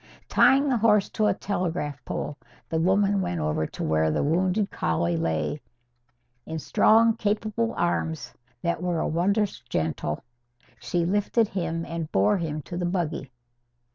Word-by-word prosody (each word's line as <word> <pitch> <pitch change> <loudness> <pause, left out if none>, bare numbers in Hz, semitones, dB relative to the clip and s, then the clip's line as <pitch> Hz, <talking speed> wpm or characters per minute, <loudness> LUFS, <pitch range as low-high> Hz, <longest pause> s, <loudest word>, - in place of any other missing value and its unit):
Tying 275 +2 +5
the 260 -3 +2
horse 210 -2 +3
to 215 -1 +1
a - - +3
telegraph 165 -8 -3
pole, 145 - -4 0.3
the 160 - 0
woman 195 +3 +3
went 90 - -2
over 75 0 0
to - - -6
where 80 0 +2
the - - 0
wounded 185 +6 +1
collie 85 +1 0
lay. 80 - -1 0.9
In 160 - -4
strong, 225 +8 +4
capable 215 +2 -1
arms, 160 -6 -1 0.3
that 170 0 -1
were 175 -2 0
wondrous 200 +5 +1
gentle, 80 -9 -3 0.6
she 175 -1 -1
lifted 205 +4 +1
him 165 -3 -2
and 165 -2 -5
bore 100 - +3
him 155 -3 -3
to 175 - -6
the 175 - -1
buggy. 165 -6 -2
170 Hz, 145 wpm, -26 LUFS, 145-205 Hz, 0.9 s, Tying